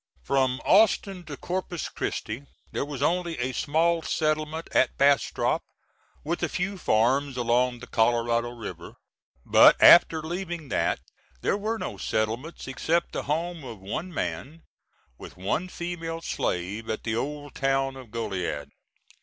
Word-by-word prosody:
From 130 - +1
Austin 195 -4 +3
to 145 -3 -7
Corpus 180 -2 -3
Christi 125 +6 -4 0.2
there - - -1
was 140 -2 -4
only 170 +1 0
a 125 +1 -1
small 165 +5 +1
settlement 155 0 -1
at 130 - +2
Bastrop, 140 0 +2 0.6
with 170 +3 -2
a - - 0
few 195 +2 -2
farms 130 +4 +2
along 125 +1 +2
the 125 - -10
Colorado 120 0 +1
River; 115 -3 -8 0.5
but - - +7
after 160 -2 +8
leaving 170 -2 -5
that, - - 0 0.4
there - - +1
were 215 +3 -2
no - - -5
settlements 115 +11 -2
except 160 +6 0
the - - -3
home 165 +1 -1
of 115 -5 -8
one 130 - -5
man, 160 0 -4 0.6
with - - -11
one 105 - -1
female 165 -2 -5
slave, 100 - -3
at 110 - -3
the 110 -1 -1
old 145 +3 -4
town 135 0 0
of 130 -3 -11
Goliad. 90 -10 -3
145 Hz, 140 wpm, -26 LUFS, 120-170 Hz, 0.6 s, after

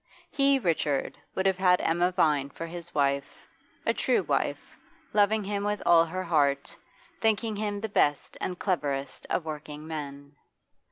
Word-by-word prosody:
He, 275 0 +4
Richard, 160 - -1 0.2
would 190 - -1
have 190 -1 +2
had 180 -1 +4
Emma 175 +2 +2
Vine 150 -6 +2
for 165 - -7
his 170 +1 -9
wife, 140 -1 0 0.4
a - - +3
true - - +1
wife, - - -2 0.4
loving 210 +1 +3
him 200 0 -2
with 205 0 -1
all 170 -1 +6
her 185 +3 -4
heart, 145 -5 +1 0.4
thinking 220 0 +1
him 205 -1 -2
the 220 - -2
best 145 -8 +1
and 180 - -3
cleverest 145 -8 -2
of 170 - -1
working 150 -1 -7
men. 145 -2 -7
170 Hz, 155 wpm, -28 LUFS, 145-200 Hz, 0.4 s, all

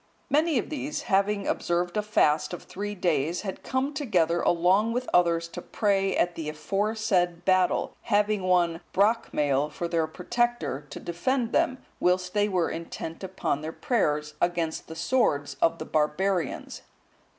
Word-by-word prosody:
Many 310 0 +3
of 235 - -2
these, 290 0 -3
having 200 +1 +1
observed 175 0 -1
a 210 - +2
fast 180 -7 +2
of 175 - -6
three 205 +2 -5
days, 170 -3 0
had 190 -3 -5
come 260 +3 -1
together 175 - +1
along 185 +6 +3
with 250 +1 -2
others 170 -1 +3
to 175 - -7
pray 195 -1 0
at 175 - +2
the 160 -2 -4
aforesaid 195 +1 0
battle, 185 -1 +2
having 210 -1 +1
one 175 -2 +2
Brocmail(173) 150 - +2
for 170 +3 -3
their 165 -2 0
protector, 235 - -1
to - - -7
defend 235 +8 -1
them, 260 - +2 0.2
whilst 180 0 +1
they 205 0 +2
were 180 -4 +1
intent 165 +1 -6
upon 190 -6 -2
their 155 +1 -4
prayers, 150 - 0
against 170 -2 -1
the 160 - -8
swords 160 - +1
of 165 0 +3
the - - -6
barbarians. 170 +4 -1
180 Hz, 150 wpm, -27 LUFS, 165-210 Hz, 0.2 s, Many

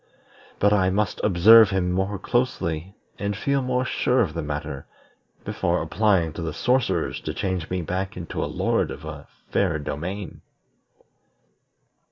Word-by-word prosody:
But 105 +1 +3
I 95 -2 +3
must 105 +3 -1
observe 110 +3 +7
him 95 -2 0
more 95 +2 -1
closely, 95 -7 -1 0.2
and 100 -1 -2
feel 140 +4 0
more 125 0 0
sure 130 0 +1
of 80 - 0
the 85 - -3
matter, 75 -2 -5 0.6
before - - 0
applying 95 -7 +1
to - - -6
the 80 -2 -3
sorcerers 120 -10 0
to - - -5
change 95 -5 -2
me 90 -1 -2
back 95 +4 -3
into 85 -2 -4
a - - -3
lord - - 0
of - - -8
a - - -8 0.2
fair 90 -5 +1
domain." 85 +6 -5
95 Hz, 150 wpm, -24 LUFS, 85-105 Hz, 0.6 s, observe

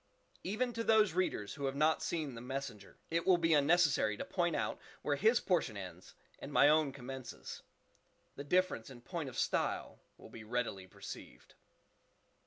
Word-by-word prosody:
Even 240 +6 -1
to 230 - -2
those 215 -5 +4
readers 170 - -1
who 140 -1 -4
have 135 - -2
not 155 +2 +3
seen 155 -6 -2
the 115 - -8
"Messenger," 130 -4 -6
it 165 +1 +1
will 185 -2 +6
be 165 -1 +3
unnecessary 145 -8 +4
to - - -4
point 175 -3 0
out - - -1 0.2
where 145 - +1
his 220 - +4
portion 160 - 0
ends 90 -2 -9 0.2
and - - -7
my 145 - +6
own 155 -1 +4
commences; 130 -1 -8 0.7
the 140 - -6
difference 180 -6 +1
in 125 -3 -11
point 160 +1 -4
of 130 - -10
style - - -1 0.2
will - - -14
be 110 - -9
readily 110 -5 -2
perceived. - - -10
145 Hz, 170 wpm, -35 LUFS, 125-175 Hz, 0.7 s, will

